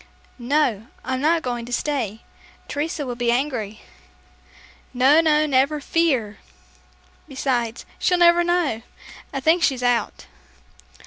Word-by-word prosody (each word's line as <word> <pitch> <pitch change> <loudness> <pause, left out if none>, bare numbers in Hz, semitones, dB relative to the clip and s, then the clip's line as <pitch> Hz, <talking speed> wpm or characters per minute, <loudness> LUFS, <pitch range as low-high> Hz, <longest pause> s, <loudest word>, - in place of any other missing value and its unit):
"No, 240 -4 0 0.2
I'm 260 0 -2
not 320 +2 +2
going 240 -2 -3
to - - -9
stay. 240 -5 -2 0.5
Teresa 295 0 -3
will 250 - -4
be 240 0 0
angry." 240 -5 -2 1.1
"No, 270 +6 +5
no, 305 -1 +3
never 280 +1 +2
fear. 270 -10 0 0.9
Besides, 245 -4 -2
she'll 360 - +2
never 345 0 +5
know. 345 -10 0 0.5
I - - -3
think 320 +5 +3
she's 265 -6 +1
out." 245 -3 0
265 Hz, 120 wpm, -22 LUFS, 240-310 Hz, 1.1 s, No